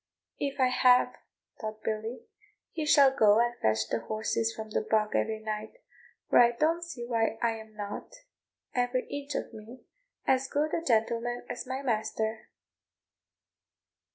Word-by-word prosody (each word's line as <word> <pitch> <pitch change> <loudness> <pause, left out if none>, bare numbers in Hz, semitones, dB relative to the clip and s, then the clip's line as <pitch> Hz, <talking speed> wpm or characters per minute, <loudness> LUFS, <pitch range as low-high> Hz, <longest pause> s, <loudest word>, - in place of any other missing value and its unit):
"If 280 0 -3
I 255 -1 +4
have," 250 0 +4 0.5
thought 215 -1 -6
Billy, 220 - -3 0.5
"he 310 -2 -3
shall 275 -2 +6
go 215 -2 +5
and 240 0 +2
fetch 110 0 +2
the 115 - -1
horses 220 - -1
from 220 -1 -8
the - - +1
bog 215 0 +1
every 220 -1 0
night; 215 -1 -5 0.5
for - - +5
I 240 0 +6
don't 325 +7 +1
see 300 -9 -6
why 225 -2 0
I 235 - +2
am 220 -1 -13
not, 205 -1 -6 0.6
every 245 0 0
inch 285 0 -5
of - - -3
me, 220 +4 -11 0.4
as 265 0 +2
good 300 +3 -1
a - - 0
gentleman 235 -1 0
as 245 - -6
my 260 +2 -4
master." 220 -2 -2
235 Hz, 155 wpm, -29 LUFS, 220-260 Hz, 0.6 s, shall